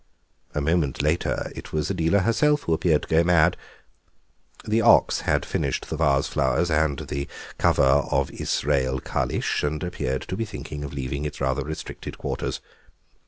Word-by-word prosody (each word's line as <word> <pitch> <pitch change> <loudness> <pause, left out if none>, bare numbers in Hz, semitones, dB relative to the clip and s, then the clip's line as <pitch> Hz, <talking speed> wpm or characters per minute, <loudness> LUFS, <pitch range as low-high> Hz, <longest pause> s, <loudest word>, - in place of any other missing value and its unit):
A 75 - 0
moment 80 -2 0
later 75 +3 0
it - - -9
was 75 -1 -1
Adela 85 +5 +2
herself 145 +8 +2
who 85 - 0
appeared 80 -1 +2
to - - -8
go 80 +1 +4
mad. 85 0 +4 1.1
The 110 +2 +2
ox - - +5
had - - +2
finished - - -2
the - - -1
vase 70 -3 +2
flowers 85 0 +1
and 75 -2 +2
the 70 0 -4 0.3
cover - - +3
of 70 +2 +2
"Israel 65 -1 0
Kalisch," - - -1
and 75 +3 -1
appeared 65 -7 -2
to 95 - -5
be 115 - -2
thinking 75 -7 -7
of 70 - -6
leaving 70 +1 -4
its 75 - -5
rather 65 -1 0
restricted 80 +3 -7
quarters. - - -3
75 Hz, 165 wpm, -24 LUFS, 70-85 Hz, 1.1 s, ox